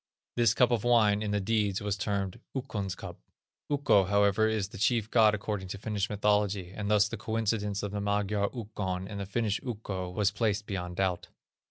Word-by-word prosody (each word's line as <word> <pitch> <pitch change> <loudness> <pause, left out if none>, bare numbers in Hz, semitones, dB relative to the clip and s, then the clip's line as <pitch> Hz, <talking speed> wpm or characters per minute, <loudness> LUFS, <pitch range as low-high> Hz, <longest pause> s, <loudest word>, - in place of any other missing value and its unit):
This 115 -2 +3
cup 125 -1 +4
of 115 -4 +1
wine, 110 -4 +4
in 105 - -2
the 105 0 +1
deeds, 100 -1 0
was 105 -1 -1
termed, 100 -2 -2 0.2
"Ukkon's 105 -8 -3
cup." - - -9 0.5
Ukko, 140 -9 +3
however, 100 +2 +3
is 110 -3 -1
the 115 - -10
chief 110 0 +1
God 110 -2 +5
according 105 -2 -4
to 95 - -5
Finnish 105 0 -2
mythology, 105 -3 +1
and 105 -1 -3
thus 105 0 +4
the - - -5
coincidence 105 -2 -1
of 100 - -3
the 105 0 -3
Magyar 100 0 0
Ukkon 100 -6 -4
and 100 -1 -6
the 100 - -4
Finnish 105 0 -1
Ukko 100 -6 -4
was 100 +2 +1
placed 105 -1 0
beyond 90 -3 -4
doubt. 90 -2 -1
105 Hz, 190 wpm, -29 LUFS, 100-110 Hz, 0.5 s, God